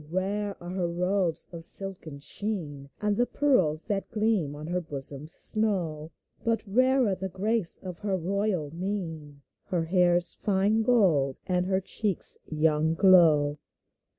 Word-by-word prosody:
rare 200 +3 -2
are 175 0 -8
her 185 -2 -1
robes 175 -1 -1
of 170 -1 -8
silken 180 -4 +2
sheen, 145 -4 -5
And 210 -1 +1
the 245 +3 +1
pearls 185 - +1
that 195 -2 -3
gleam 210 -9 0
on 150 +1 -8
her 180 +2 -2
bosom's 145 -1 -2
snow; 175 -10 +1 0.3
But 230 -2 0
rarer 255 +1 +2
the 190 +1 -5
grace 200 +1 +1
of 180 -2 -7
her 200 -2 -1
royal 185 -3 -2
mien, 165 -6 -5 0.2
Her 175 -3 -1
hair's 175 0 +2
fine 205 +2 +1
gold, 180 - +2
and 180 0 0
her 190 0 0
cheek's 200 0 0
young 155 0 +1
glow. 160 -6 +4
180 Hz, 140 wpm, -27 LUFS, 160-205 Hz, 0.3 s, glow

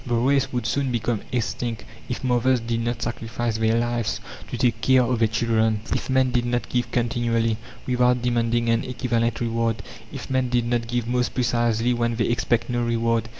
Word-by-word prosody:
The 120 -2 -1
race 135 +3 +2
would 125 -3 -2
soon 135 +2 0
become 115 -2 -1
extinct 120 -1 -2 0.2
if 125 - -4
mothers 125 0 +2
did 115 0 -2
not 120 +1 -2
sacrifice 115 -1 -3
their 110 0 +2
lives 120 -1 -1 0.3
to - - -4
take 115 -2 +1
care 130 -1 +5
of 120 -1 0
their 115 - +4
children, 110 -1 +1
if - - -3
men 130 -1 +3
did 120 -1 +1
not 120 0 -1
give 125 -1 0
continually, 115 -2 0 0.3
without 125 -1 +2
demanding 120 -1 +1
an 115 0 +2
equivalent 120 -2 -1
reward, 115 -1 -1 0.3
if - - -7
men 130 -1 0
did 120 -1 +1
not 120 -1 0
give 120 -1 -1
most 125 0 0
precisely 120 -1 +1
when 120 -1 0
they 115 - +1
expect 120 -1 +1
no 120 -1 -1
reward. 115 -1 0
120 Hz, 190 wpm, -24 LUFS, 115-125 Hz, 0.3 s, care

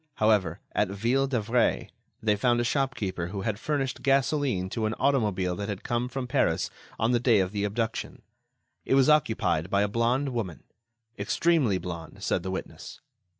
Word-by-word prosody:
However, 100 -6 +2
at 105 - +1
Ville 120 +8 +1
d'Avray, 120 -2 0 0.3
they 105 -1 +3
found 120 +3 +2
a - - +2
shopkeeper 120 - -1
who 100 +2 -5
had 105 +1 -2
furnished 140 -2 -2
gasoline 135 -7 +1
to 110 -2 -1
an 110 - -2
automobile 105 -10 +1
that 100 +1 -4
had 100 -2 -5
come 120 +1 -1
from 130 +1 -4
Paris 120 - +1 0.3
on 115 +2 +1
the 120 - +3
day 115 -3 +4
of 95 -1 0
the 100 -1 -2
abduction. 110 +2 -3 0.6
It - - +2
was 135 +1 +5
occupied 110 - +2
by 100 0 +2
a - - +1
blonde 120 +6 +1
woman—extremely 115 - -2
blonde, 85 +1 -7
said 90 - 0
the 95 - -5
witness. 95 - -6
110 Hz, 165 wpm, -27 LUFS, 100-125 Hz, 0.6 s, was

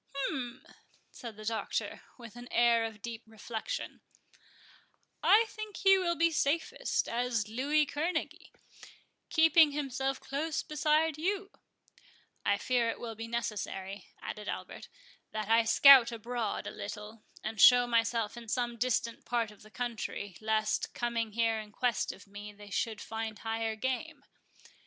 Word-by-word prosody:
"Hum!" 260 -3 -3 0.5
said 235 -3 -9
the 215 - -9
Doctor, 225 0 -2 0.2
with 235 -2 -11
an 240 0 -9
air 235 -1 +4
of 220 -2 -8
deep 235 -1 -5
reflection—"I 235 - -3
think 430 -1 -8
he 390 -1 +5
will 345 -2 0
be 335 +1 +3
safest 310 +1 0
as 235 -3 -1
Louis 285 +7 +1
Kerneguy, 315 +3 -3 0.8
keeping 320 -2 +5
himself 270 -2 -2
close 295 +2 -2
beside 305 +1 +1
you"— 390 +4 -1 0.9
"I 200 - +2
fear 240 +1 +1
it - - -4
will 230 -1 -5
be 225 +1 -7
necessary," 205 -4 -4
added 210 -1 -6
Albert, - - -6 0.5
"that 215 -1 -3
I 225 0 +5
scout 260 0 +8
abroad 230 -1 -3
a - - -4
little, 210 +1 -8 0.2
and 220 0 -2
show 245 -1 +8
myself 230 -2 +1
in 235 -1 -10
some 240 +1 -1
distant 235 -1 -1
part 230 -3 -1
of 210 - -17
the 215 - -15
country, 215 -4 -4
lest, 215 0 0
coming 230 -2 -2
here 225 0 +1
in 210 -1 -9
quest 240 0 0
of 195 - -14
me, 205 +1 -9
they 205 0 -14
should 220 0 -2
find 225 -1 -5
higher 225 0 -2
game." 270 +6 -3
235 Hz, 140 wpm, -31 LUFS, 220-275 Hz, 0.9 s, scout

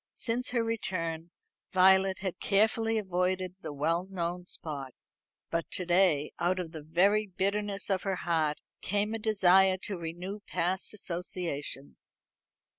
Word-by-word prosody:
Since 245 +2 -1
her 240 -2 +1
return 170 -7 -2 0.4
Violet 190 +1 +5
had 190 -2 -3
carefully 220 +2 +2
avoided 185 -2 -1
the 155 - -5
well 165 +5 0
known 180 -1 -3
spot; 140 -7 -5 0.6
but 165 -1 -1
to 180 - 0
day, 175 -4 +3
out 180 +2 +1
of 175 -3 -4
the 160 -2 -7
very 195 +7 +2
bitterness 200 +2 -1
of 195 -2 +1
her 195 -1 -1
heart, 160 -3 +1 0.2
came 205 +2 0
a 225 - -2
desire 190 -3 +4
to 195 -4 -1
renew 175 +5 -5
past 185 +4 -1
associations. 170 -7 -3
185 Hz, 135 wpm, -30 LUFS, 170-200 Hz, 0.6 s, Violet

